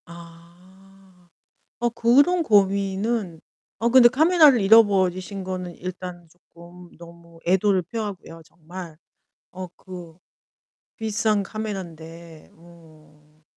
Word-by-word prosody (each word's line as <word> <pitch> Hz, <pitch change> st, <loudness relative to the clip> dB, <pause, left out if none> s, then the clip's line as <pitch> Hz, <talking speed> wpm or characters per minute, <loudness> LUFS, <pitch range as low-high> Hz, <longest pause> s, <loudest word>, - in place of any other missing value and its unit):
아. 180 Hz, +2 st, -18 dB, 0.5 s
어, 240 Hz, -, +1 dB
그런 270 Hz, +10 st, +3 dB
고민은 200 Hz, -, 0 dB, 0.4 s
어, 230 Hz, -, 0 dB
근데 250 Hz, -1 st, +7 dB
카메라를 305 Hz, -1 st, +4 dB
잃어버리신 195 Hz, -2 st, +3 dB
거는 185 Hz, -2 st, -6 dB
일단 180 Hz, -1 st, -8 dB
쪼끔 175 Hz, +1 st, -17 dB
너무 170 Hz, 0 st, -16 dB
애도를 190 Hz, +1 st, +2 dB
표하고요, 190 Hz, -4 st, -7 dB
정말. 170 Hz, 0 st, -11 dB, 0.6 s
어 185 Hz, 0 st, -7 dB
그 175 Hz, -4 st, -11 dB, 0.8 s
비싼 215 Hz, -1 st, -1 dB
카메란데. 170 Hz, -6 st, -8 dB
어. 155 Hz, -2 st, -21 dB
185 Hz, 200 characters per minute, -23 LUFS, 170-210 Hz, 0.8 s, 근데